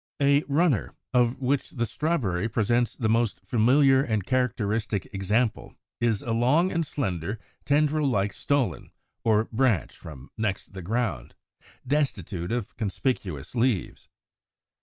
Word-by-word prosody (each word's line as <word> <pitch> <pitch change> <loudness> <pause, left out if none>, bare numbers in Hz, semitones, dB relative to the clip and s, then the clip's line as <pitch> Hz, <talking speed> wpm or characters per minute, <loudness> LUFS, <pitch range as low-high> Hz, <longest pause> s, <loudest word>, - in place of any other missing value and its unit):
=A 140 0 +4
Runner=, 145 - +1 0.2
of 125 -1 +3
which 135 +1 0
the 120 - -2
Strawberry 115 - -1
presents 120 +2 +1
the 110 - -1
most 115 0 +1
familiar 130 +5 +4
and 110 -7 -1
characteristic 110 -5 -1
example, 105 +4 -1 0.2
is 115 -4 +1
a 115 - -3
long 140 +11 +3
and 170 -1 0
slender, 100 - -3 0.3
tendril 150 +1 +2
like 100 -5 0
stolon, 140 -4 -1 0.3
or 110 -1 +3
branch 120 -5 +1
from 70 -4 -11
next 100 -3 -2
the 95 - -7
ground, 100 - -2 0.5
destitute 105 - -1
of 120 0 -3
conspicuous 100 - -2
leaves. 120 -6 -1
115 Hz, 125 wpm, -26 LUFS, 100-135 Hz, 0.5 s, =A